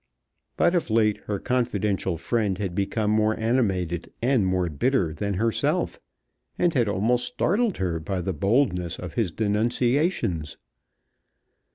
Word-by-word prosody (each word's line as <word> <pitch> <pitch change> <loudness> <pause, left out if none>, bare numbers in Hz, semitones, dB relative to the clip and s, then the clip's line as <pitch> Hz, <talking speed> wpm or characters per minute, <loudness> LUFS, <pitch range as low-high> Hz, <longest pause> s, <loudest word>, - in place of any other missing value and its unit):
But 175 - +3
of 175 -7 0
late 110 -1 +3
her 105 - -1
confidential 105 -7 -1
friend 105 +1 0
had 95 -3 -3
become 105 +3 0
more 110 0 +2
animated 95 -8 0
and 120 -5 +2
more 90 -1 +1
bitter 85 - 0
than 100 +5 -2
herself, 110 +1 0 0.6
and 175 -2 +2
had 120 -5 +2
almost 115 +5 +1
startled 210 +2 0
her 85 -3 -1
by 90 +3 -3
the 95 +2 -2
boldness 90 - +1
of 90 - -7
his 110 -8 0
denunciations. 110 - 0
105 Hz, 135 wpm, -25 LUFS, 90-120 Hz, 0.6 s, But